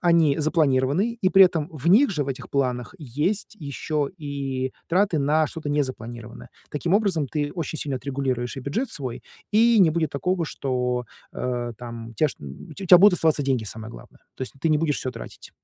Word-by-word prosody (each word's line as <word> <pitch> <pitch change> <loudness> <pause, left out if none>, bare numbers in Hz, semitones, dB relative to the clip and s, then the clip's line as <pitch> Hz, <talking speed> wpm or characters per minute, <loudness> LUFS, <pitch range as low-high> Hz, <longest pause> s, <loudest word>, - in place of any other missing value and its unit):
они 165 -4 +4
запланированные, 155 - +2
и 185 - +3
при 195 0 +8
этом 165 -3 -2
в 155 +1 -2
них 230 +4 +6
же, 150 -6 -1
в - - -6
этих 130 - -5
планах, 125 +2 -1
есть 155 - -2
ещё 145 0 -2
и 135 -3 -3 0.2
траты 180 -2 +2
на 150 +2 +2
что-то 155 -3 -6
незапланированное. 120 -5 -4 0.2
Таким 170 +5 0
образом 190 -9 +2
ты 145 +1 -2
очень 160 -3 -4
сильно 140 -3 -2
отрегулируешь 130 -1 -3
и - - -4
бюджет 220 - -2
свой, 130 -5 -5 0.3
и 225 +1 +5
не 165 -4 +6
будет 160 -2 0
такого, 175 +4 -1
что, 125 -4 -2 0.3
э, 120 -1 -3
там, 115 -2 -8
у - - -12
тебя 150 +8 +2
чт - - -11 0.4
у - - -4
тя 180 0 +9
будут 200 -1 +7
оставаться 160 -4 +2
деньги, 130 -5 0
самое 110 +1 -7
главное. - - -14 0.2
То - - -5
есть 130 - -5
ты 165 - +1
не 155 -1 +3
будешь 150 -2 0
всё 130 - -3
тратить. 115 - -10
145 Hz, 195 wpm, -24 LUFS, 130-170 Hz, 0.4 s, тя